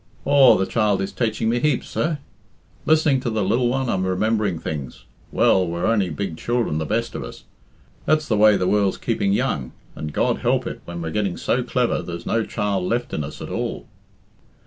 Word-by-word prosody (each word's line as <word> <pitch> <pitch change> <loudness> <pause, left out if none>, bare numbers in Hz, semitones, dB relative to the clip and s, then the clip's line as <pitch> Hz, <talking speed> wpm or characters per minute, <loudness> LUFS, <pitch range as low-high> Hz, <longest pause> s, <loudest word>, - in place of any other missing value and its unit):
Aw, 140 -3 +6
the 95 - +1
child 105 -2 +1
is 95 0 -2
taiching 110 -2 -1
me 120 +2 +1
heaps, 150 +3 0
sir. 155 -1 -1 0.7
Listening 155 -3 +4
to 125 - -2
the 110 -2 0
lil 115 +6 +2
one 130 +1 0
I'm 95 -5 0
remembering 100 0 0
things. 70 -7 -6 0.3
Well, 95 -2 +3
we're 85 +1 -2
only 105 -5 +2
big 80 +1 -4
children, 120 -9 -1
the 80 - -3
best 115 +2 -1
of - - -5
us. - - -10 0.6
That's 155 0 +2
the 110 - +1
way 105 -1 +6
the 90 - 0
world's 100 -1 +2
keeping 110 -4 0
young, 100 - -1 0.2
and 75 -1 -5
God - - 0
help - - +1
it - - -6
when 85 -1 -6
we're 80 - -4
getting 100 -1 -1
so - - 0
clever - - 0
there's 85 0 -7
no 115 0 +1
child 100 -3 -2
left 120 +5 -2
in 75 - -1
us 75 +1 -7
at - - -7
all." - - -3
105 Hz, 200 wpm, -22 LUFS, 90-120 Hz, 0.7 s, Aw